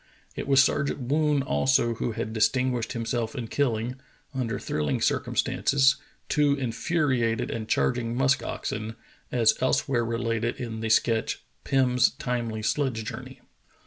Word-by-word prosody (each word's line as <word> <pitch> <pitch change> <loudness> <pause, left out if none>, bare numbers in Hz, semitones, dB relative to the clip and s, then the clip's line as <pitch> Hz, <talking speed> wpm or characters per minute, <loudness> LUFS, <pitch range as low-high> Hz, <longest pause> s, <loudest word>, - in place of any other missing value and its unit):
It - - -5
was 135 -1 +6
Sergeant 140 0 0
Woon 145 +2 +1
also 130 -3 +2
who 115 +1 -3
had 110 0 -4
distinguished 125 +2 +1
himself 115 0 -2
in 120 -4 -4
kilUng, 125 -2 -1 0.3
under 125 -4 -2
thrilling 75 -2 -1
circumstances, 135 -1 +2 0.3
two 145 -1 +3
infuriated 125 -2 0
and 110 -1 -5
charging 120 -1 0
musk 135 +2 +2
oxen, 110 +1 -4 0.4
as 115 -3 +4
elsewhere 130 -1 +1
re 115 0 -2
lated 115 -1 -1
in 115 -3 -5
the 110 0 -2
sketch, 115 0 +1 0.2
"Pim's 125 -2 +3
Timely 115 -3 -3
Sledge 125 -3 0
Journey." 110 - -8
120 Hz, 135 wpm, -26 LUFS, 115-135 Hz, 0.4 s, was